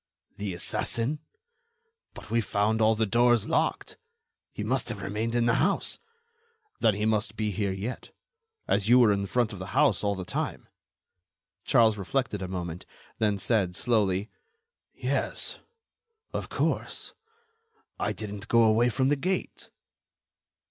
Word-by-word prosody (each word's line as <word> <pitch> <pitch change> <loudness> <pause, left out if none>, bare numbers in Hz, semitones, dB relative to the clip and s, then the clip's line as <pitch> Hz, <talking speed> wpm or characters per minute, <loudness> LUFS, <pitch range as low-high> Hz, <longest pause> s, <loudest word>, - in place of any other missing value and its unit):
"The 100 -3 -4
assassin." 115 +10 0 1.0
"But - - -11
we 115 0 +3
found 105 +2 0
all 110 +1 +4
the 110 0 +1
doors 120 +1 +3
locked." - - 0 0.5
"He - - -5
must - - 0
have - - -5
remained 110 +4 -2
in 120 -1 +2
the 115 - +3
house." 195 +5 0 0.8
"Then 110 -3 +3
he 105 +1 -1
must 110 -1 0
be 110 -1 -1
here 100 0 -1
yet, 100 +7 -5 0.6
as 105 +1 +1
you 125 - +8
were 120 -4 +6
in 100 -1 0
front 120 0 0
of 100 - -8
the 95 - -6
house 145 -5 +3
all 100 -1 +1
the 95 -1 -6
time." - - -3 1.0
Charles 110 -3 +4
reflected 105 0 -1
a 95 - -3
moment, 90 -2 -5 0.3
then 105 -2 +2
said, 95 -3 +1
slowly: 105 -3 +1 0.6
"Yes... - - -2 0.7
of - - -4
course.... - - -2 0.9
I - - 0
didn't 105 -1 -6
go 115 0 +5
away 115 +2 +4
from 130 +2 +1
the 145 - +3
gate." 185 +7 -3
110 Hz, 145 wpm, -28 LUFS, 100-120 Hz, 1.0 s, you